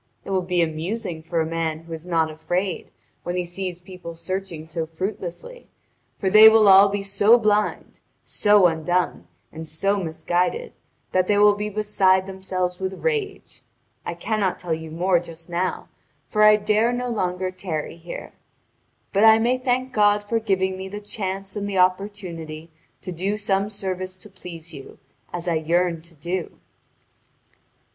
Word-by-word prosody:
It -, -, -6 dB
will 190 Hz, -1 st, +2 dB
be 180 Hz, -1 st, +1 dB
amusing 165 Hz, +3 st, -3 dB
for 165 Hz, +1 st, -1 dB
a -, -, 0 dB
man 160 Hz, -1 st, -2 dB
who 165 Hz, 0 st, -9 dB
is 160 Hz, +2 st, -8 dB
not 165 Hz, -2 st, +1 dB
afraid 175 Hz, +4 st, -3 dB, 0.3 s
when 175 Hz, -, -4 dB
he 180 Hz, -1 st, -1 dB
sees 180 Hz, 0 st, -5 dB
people 180 Hz, -2 st, -10 dB
searching 185 Hz, -2 st, -5 dB
so 165 Hz, 0 st, -4 dB
fruitlessly, 190 Hz, -, -6 dB, 0.5 s
for 195 Hz, -, -2 dB
they 215 Hz, +3 st, +9 dB
will 220 Hz, -1 st, +5 dB
all 195 Hz, +1 st, +8 dB
be 200 Hz, 0 st, -2 dB
so 205 Hz, +4 st, +5 dB
blind, 210 Hz, -2 st, 0 dB, 0.2 s
so 205 Hz, -2 st, +4 dB
undone, 175 Hz, +2 st, 0 dB, 0.2 s
and 160 Hz, +1 st, -8 dB
so 195 Hz, +6 st, 0 dB
misguided 175 Hz, -, -1 dB, 0.4 s
that 185 Hz, -1 st, +2 dB
they 205 Hz, -, +3 dB
will 205 Hz, 0 st, +6 dB
be 210 Hz, +1 st, -3 dB
beside 195 Hz, -3 st, +2 dB
themselves 185 Hz, -2 st, -3 dB
with 190 Hz, 0 st, -4 dB
rage. 440 Hz, -4 st, -2 dB, 0.4 s
I -, -, -4 dB
cannot 210 Hz, -4 st, -1 dB
tell 175 Hz, -2 st, -3 dB
you 160 Hz, 0 st, -5 dB
more 175 Hz, +3 st, +2 dB
just 165 Hz, 0 st, -11 dB
now, 180 Hz, +2 st, -2 dB, 0.4 s
for 215 Hz, -, 0 dB
I 215 Hz, 0 st, +8 dB
dare 215 Hz, +2 st, +2 dB
no 245 Hz, 0 st, -2 dB
longer 185 Hz, -4 st, -1 dB
tarry 170 Hz, -4 st, -5 dB
here. 170 Hz, +1 st, -8 dB, 0.8 s
But 200 Hz, +2 st, +3 dB
I 220 Hz, 0 st, +8 dB
may 245 Hz, +3 st, +1 dB
thank 255 Hz, 0 st, -1 dB
God 205 Hz, -1 st, +3 dB
for 225 Hz, +2 st, 0 dB
giving 190 Hz, -3 st, 0 dB
me 190 Hz, 0 st, -6 dB
the 205 Hz, +2 st, -6 dB
chance 195 Hz, -1 st, -5 dB
and 205 Hz, -1 st, -3 dB
the 195 Hz, -, -2 dB
opportunity 180 Hz, -4 st, -1 dB, 0.3 s
to 185 Hz, -, -5 dB
do 190 Hz, +5 st, -2 dB
some 200 Hz, -1 st, 0 dB
service 185 Hz, -2 st, -4 dB
to 210 Hz, -, -13 dB
please 170 Hz, -3 st, -10 dB
you, 135 Hz, -2 st, -11 dB, 0.3 s
as 175 Hz, 0 st, -5 dB
I 170 Hz, -2 st, +2 dB
yearned 170 Hz, +1 st, 0 dB
to 170 Hz, -1 st, -17 dB
do." 175 Hz, +4 st, -4 dB
185 Hz, 165 wpm, -23 LUFS, 170-205 Hz, 0.8 s, they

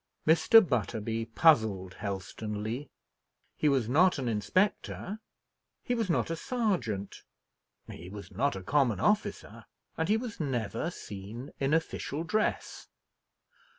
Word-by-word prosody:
Mr. 175 Hz, +7 st, +6 dB
Butterby 115 Hz, -1 st, -1 dB
puzzled 110 Hz, -, +3 dB
Helstonleigh. 105 Hz, +5 st, -4 dB, 0.7 s
He 150 Hz, -, +2 dB
was 130 Hz, -5 st, +2 dB
not 170 Hz, +9 st, +4 dB
an 130 Hz, -3 st, -3 dB
inspector, 185 Hz, -, 0 dB, 0.6 s
he 245 Hz, -, -1 dB
was 225 Hz, -5 st, -1 dB
not 165 Hz, -, +1 dB
a -, -, 0 dB
sergeant, 160 Hz, -, -2 dB, 0.7 s
he 90 Hz, -, -9 dB
was 100 Hz, +1 st, -9 dB
not 140 Hz, -4 st, 0 dB
a 95 Hz, -, -6 dB
common 125 Hz, -3 st, +2 dB
officer, 210 Hz, -, -1 dB, 0.3 s
and 160 Hz, +3 st, 0 dB
he 215 Hz, -, +4 dB
was 230 Hz, -2 st, -6 dB
never 130 Hz, -, -2 dB
seen 110 Hz, -, -8 dB
in 135 Hz, +1 st, 0 dB
official 160 Hz, -1 st, -1 dB
dress. 215 Hz, +6 st, -1 dB
135 Hz, 120 wpm, -30 LUFS, 105-170 Hz, 0.7 s, Mr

